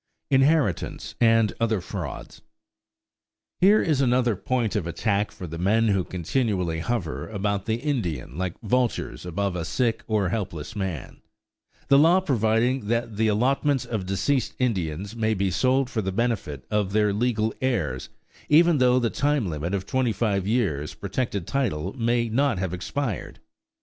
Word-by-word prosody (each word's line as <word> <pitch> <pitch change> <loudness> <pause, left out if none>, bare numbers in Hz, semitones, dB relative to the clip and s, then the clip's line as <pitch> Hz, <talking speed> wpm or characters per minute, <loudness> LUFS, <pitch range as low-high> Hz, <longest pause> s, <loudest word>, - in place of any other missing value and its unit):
INHERITANCE 135 - +2
AND 115 -4 +4
OTHER 115 -3 +1
FRAUDS 85 - -7 1.2
Here 205 +4 +6
is 150 -5 +1
another 125 -3 +2
point 115 +1 -1
of 95 -6 -1
attack 100 +4 0
for 90 - -9
the 85 0 -6
men 110 +5 +3
who 100 -2 +2
continually 90 -2 -1
hover 80 - -3
about 100 -1 -2
the 110 - +1
Indian 115 - -3
like 90 0 -3
vultures 120 -4 -1
above 95 +2 -1
a 85 - -2
sick 115 +7 0
or 105 -5 +1
helpless 95 -3 -4
man 95 -8 -5 0.7
the 140 0 +6
law 170 +5 +6
providing 120 - +1
that 115 -1 -1
the 110 0 +2
allotments 135 +5 +1
of 105 -5 -3
deceased 110 +8 0
Indians 100 -4 -2
may 110 -1 +1
be 95 -1 0
sold 130 +6 +2
for 115 -3 -2
the 95 -1 -2
benefit 95 - -2
of 105 -2 0
their 105 -1 +3
legal 110 0 0
heirs, 90 - -1 0.4
even 165 0 +5
though 125 0 +4
the 120 -3 +1
time 145 -6 +1
limit 80 +5 -2
of 95 -1 -3
twenty 130 +1 +1
five 100 -5 0
years 95 - 0
protected 100 -2 -3
title 95 - -1
may 120 -1 +1
not 135 +1 +1
have 90 -1 -2
expired. 105 +4 -4
110 Hz, 155 wpm, -25 LUFS, 95-125 Hz, 1.2 s, Here